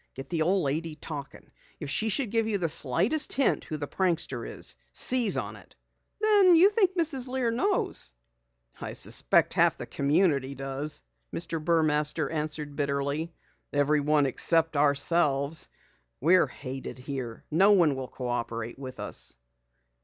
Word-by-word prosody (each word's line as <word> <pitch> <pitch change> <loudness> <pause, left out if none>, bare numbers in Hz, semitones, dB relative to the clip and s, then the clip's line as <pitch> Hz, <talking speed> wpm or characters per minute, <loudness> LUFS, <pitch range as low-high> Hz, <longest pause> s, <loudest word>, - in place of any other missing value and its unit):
Get 135 +1 -9
the 165 -2 0
old 185 +3 +2
lady 155 +3 -2
to - - -32
talking. 140 -3 -8 0.3
If - - -6
she 220 +9 0
should 220 +1 -1
give 225 -1 +1
you 215 -2 0
the 175 -3 -1
slightest 190 - +1
hint 275 - +1
who 155 - -4
the 145 - -4
prankster 165 -10 -1
is, - - -4 0.2
seize 245 -5 +2
upon - - -4
it." - - -18 0.4
"Then 410 -4 +6
you 370 +5 +6
think 385 -4 +2
Mrs. 290 -6 0
Lear 250 -2 -1
knows?" 360 - -1 0.7
"I - - -5
suspect - - +2
half - - +3
the - - -6
community 140 -2 +1
does!" 135 - -5 0.3
Mr. 165 -2 -4
Burmaster 155 -3 +1
answered 150 -2 -3
bitterly. 140 +3 -2 0.4
"Everyone 145 0 +2
except 160 +4 +3
ourselves. 145 +1 +2 0.5
We're 175 +5 +4
hated 130 -1 -7
here. 125 -3 -6
No 195 +6 +5
one 170 -7 +4
will 130 -1 -5
cooperate 120 -2 -4
with 130 -2 -8
us." - - -5
155 Hz, 145 wpm, -27 LUFS, 140-195 Hz, 0.7 s, Then